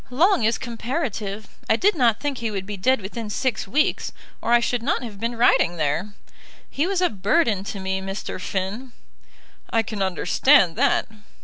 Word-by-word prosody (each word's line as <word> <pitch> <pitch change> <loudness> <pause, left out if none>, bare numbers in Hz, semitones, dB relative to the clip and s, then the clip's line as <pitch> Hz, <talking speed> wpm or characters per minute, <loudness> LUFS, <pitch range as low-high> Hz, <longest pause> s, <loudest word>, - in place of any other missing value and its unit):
"Long 320 - +3
is 225 +2 +2
comparative. 230 - -4 0.2
I - - +5
did 405 - +3
not 235 -7 +2
think 285 -3 -3
he 230 -1 -2
would 195 -3 -4
be 205 +1 -5
dead 225 +6 +2
within 215 +3 -6
six 235 +1 -1
weeks, 295 +10 0 0.3
or - - -2
I 240 - +6
should 240 0 -1
not 260 +1 -1
have 210 -4 -8
been 230 +2 -2
riding 200 -7 +3
there. 160 +7 -1 0.5
He 295 +5 -1
was 385 -1 0
a 360 - +3
burden 210 - +1
to 200 - -5
me, 190 0 -2
Mr. 195 -1 -5
Finn." 205 +8 -4 0.8
"I 225 -1 +2
can 210 -1 -5
understand 190 - +3
that." 280 +9 +2
225 Hz, 180 wpm, -23 LUFS, 195-260 Hz, 0.8 s, I